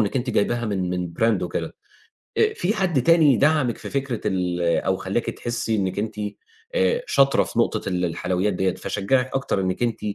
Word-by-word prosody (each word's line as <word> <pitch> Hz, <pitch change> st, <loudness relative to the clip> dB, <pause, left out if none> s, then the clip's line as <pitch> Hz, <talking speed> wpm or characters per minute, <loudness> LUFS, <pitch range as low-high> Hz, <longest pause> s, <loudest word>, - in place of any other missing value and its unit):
إنّك 105 Hz, +3 st, 0 dB
أنتِ 125 Hz, 0 st, -1 dB
جايباها 120 Hz, +2 st, +1 dB
من 95 Hz, -4 st, -1 dB
من 90 Hz, -2 st, -3 dB
brand 115 Hz, -1 st, +3 dB
وكده، -, -, -4 dB, 0.6 s
آآ 435 Hz, -1 st, +3 dB
فيه 195 Hz, -, 0 dB
حد 175 Hz, -, +1 dB
تاني 160 Hz, -6 st, +5 dB
دَعَمِك 145 Hz, -5 st, +2 dB
في -, -, -8 dB
فكرة 135 Hz, -4 st, -2 dB
ال 90 Hz, -3 st, -1 dB
أو 85 Hz, +2 st, +1 dB
خلّاكِ 100 Hz, +6 st, -2 dB
تحسّي 120 Hz, -1 st, -2 dB
إنِّك 95 Hz, -2 st, -1 dB
أنتِ 110 Hz, +1 st, -3 dB, 0.6 s
آآ -, -, +2 dB
شاطرة 140 Hz, 0 st, +4 dB
في -, -, -4 dB
نقطة -, -, 0 dB
ال 90 Hz, -1 st, 0 dB
الحلويات 90 Hz, +4 st, -1 dB
ديّة، 95 Hz, 0 st, 0 dB
فشجّعِك 125 Hz, +7 st, 0 dB
أكتر 130 Hz, -7 st, 0 dB
إنِّك 95 Hz, +4 st, -1 dB
أنتِ 120 Hz, -2 st, -1 dB
110 Hz, 185 wpm, -23 LUFS, 95-135 Hz, 0.6 s, تاني